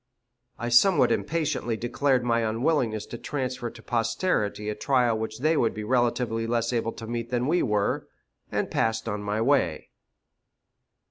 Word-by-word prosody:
I 120 - -3
somewhat 170 +10 +5
impatiently 150 -8 -1
declared 125 +2 +1
my 115 -1 +2
unwillingness 115 -1 0
to 120 - -8
transfer 130 -4 -3
to - - -14
posterity 115 - 0
a 105 - -1
trial 125 -1 +2
which 110 +1 -4
they 155 +3 +3
would 115 -7 +1
be 105 - -4
relatively 120 -1 0
less 115 +1 0
able 115 -1 -1
to 115 - -8
meet 115 0 -4
than 125 0 0
we 170 +5 +2
were, 105 -4 0 0.4
and - - -1
passed 115 0 0
on 105 -2 -2
my 105 +2 -1
way. 115 - +1
120 Hz, 155 wpm, -26 LUFS, 110-130 Hz, 0.4 s, somewhat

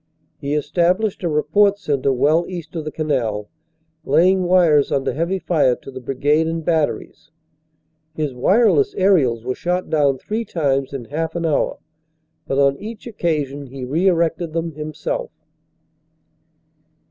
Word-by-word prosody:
He 145 0 -2
established 180 +7 0
a 175 - -1
report 160 +7 +3
centre 140 -8 0
well 155 +6 +2
east 175 -3 -8
of 160 -2 -4
the 155 - -4
canal, 120 -10 -2 0.5
laying 180 +6 +3
wires 170 -5 +4
under 135 - 0
heavy 170 +5 -1
fire 155 -9 +2
to 135 - -12
the 130 - -7
Brigade 145 +5 +1
and 165 -1 -3
Batteries. 160 -1 -1 0.9
His 150 -4 -2
wireless 230 - +3
aerials 150 - +2
were 130 - -1
shot 180 +3 -2
down 145 -4 +2
three 215 - -3
times 140 -9 -1
in 135 -4 -6
half 160 +5 -3
an 170 -1 -2
hour 155 -3 0 0.7
but 135 - -1
on 140 0 +3
each 220 +1 -8
occasion 150 - -2
he 130 0 -7
re 160 +9 +1
erected 165 -2 +1
them 165 0 -2
himself. 155 0 -4
155 Hz, 145 wpm, -20 LUFS, 140-175 Hz, 0.9 s, wires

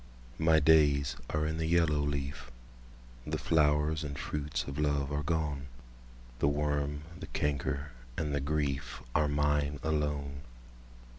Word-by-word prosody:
My 80 0 +5
days 70 -4 +4
are 75 0 0
in 80 +1 -2
the 80 - 0
yellow 80 -3 +3
leaf; 70 -2 -3 0.8
The - - -1
flowers 75 0 +2
and 70 -2 -5
fruits 70 -5 -2
of 70 +3 -5
love 70 -1 +1
are 75 0 0
gone; 75 -3 -1 0.7
The - - +3
worm, 75 0 0 0.2
the 95 - -7
canker, 70 -1 -1 0.3
and 75 -2 -1
the 70 - 0
griefAre 70 -2 -1
mine 75 0 +1
alone! 75 -2 -1
75 Hz, 130 wpm, -31 LUFS, 70-75 Hz, 0.8 s, My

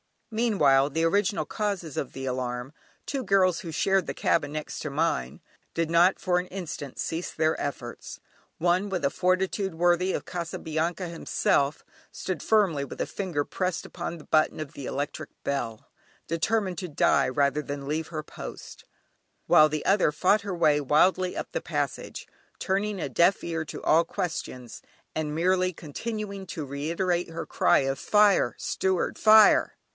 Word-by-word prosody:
Meanwhile 150 - +3
the 165 +3 0
original 200 +4 +1
causes 200 - -3
of 135 - -3
the 135 0 -6
alarm 125 +1 -3 0.3
two 275 -2 -3
girls 185 -4 +3
who 165 - -7
shared 190 +3 +1
the - - -2
cabin 145 -3 +1
next 155 0 -5
to 150 - -4
mine 140 - -1 0.3
did 165 -1 0
not 175 +3 +4
for 180 -1 +1
an 180 - -5
instant 170 -7 -6
cease 165 +2 -3
their 160 0 0
efforts. 120 -4 -6 0.4
One, 180 +4 +2
with 185 -3 -2
a 140 - +3
fortitude 190 0 0
worthy 175 +2 +2
of - - -3
Casabianca 170 0 -3
himself, 165 -3 0 0.3
stood 185 -5 -4
firmly 190 -10 +2
with - - -7
a - - +1
finger 175 -7 -2
pressed 185 +3 -3
upon 170 -1 -5
the 155 - -12
button 155 0 +2
of 150 -2 -6
the 140 - -8
electric 145 +2 -4
bell, 120 -6 -3 0.4
determined 185 +3 0
to 185 - -4
die 140 -3 +3
rather 140 +3 +1
than 140 -1 -6
leave 155 +2 -2
her 155 -3 -5
post, - - -10 0.6
while 155 0 +7
the 155 0 -3
other 190 -6 +3
fought 200 +7 +3
her 200 -2 -4
way 155 -3 +3
wildly 180 +6 +3
up - - -5
the - - -2
passage, - - -3 0.3
turning 200 +1 -1
a 145 - -2
deaf 170 +9 +3
ear 165 -2 -3
to - - -8
all 165 +2 +4
questions, 130 -9 -5 0.3
and 150 -1 -2
merely 185 +2 +2
continuing 200 +5 -6
to 160 -3 -5
reiterate 170 +6 -1
her 165 0 -5
cry - - +3
of: 135 0 -1
"Fire! 205 - +4
Steward! 190 -2 -1
Fire!" 215 -1 +6
165 Hz, 160 wpm, -27 LUFS, 145-190 Hz, 0.6 s, while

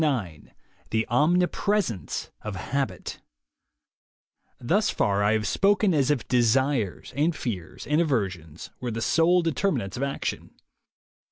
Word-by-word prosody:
IX 100 - -2 0.4
THE 110 0 0
OMNIPRESENCE 175 - +1
OF 105 -2 -5
HABIT 135 +8 -3 1.4
npHUS 195 - +1
far 100 0 +1
I 105 +1 +3
have 110 -1 0
spoken 200 - +3
as 140 -3 +2
if 145 -5 0
desires 125 -3 +1
(and 155 +4 +1
fears 95 - -5
■* - - -13
and 150 +3 +4
aversions) 95 - -2
were 125 - -3
the 115 0 -3
sole 175 +5 +3
determinants 155 - -1
of - - -4
action. 140 0 -3
130 Hz, 125 wpm, -26 LUFS, 105-165 Hz, 1.4 s, and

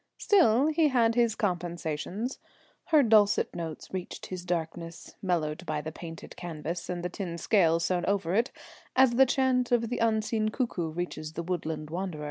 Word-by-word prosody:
Still 275 - +4
he 315 0 +3
had 235 -4 +3
his 235 -2 +2
compensations; 175 - -3 0.5
her 310 -3 +5
dulcet 215 -3 +4
notes 165 -1 -6
reached 185 -2 -5
his 185 -1 -6
darkness 170 -1 -4
(mellowed 160 -5 -1
by 155 -1 -1
the 155 +1 -5
painted 165 0 -9
canvas 170 0 -5
and 175 -1 -3
the - - +2
tin 175 -2 -5
scales 170 -3 +3
sewn 175 0 0
over 190 -4 0
it), 230 +5 +2 0.4
as 260 -1 +6
the 260 +3 +5
chant 255 -2 +2
of 235 -2 +2
the 245 - -1
unseen 220 -1 +1
cuckoo 215 -9 -2
reaches 160 -2 -5
the 170 - -4
woodland 160 -3 -3
wanderer. 180 -2 -3
180 Hz, 165 wpm, -29 LUFS, 165-230 Hz, 0.5 s, as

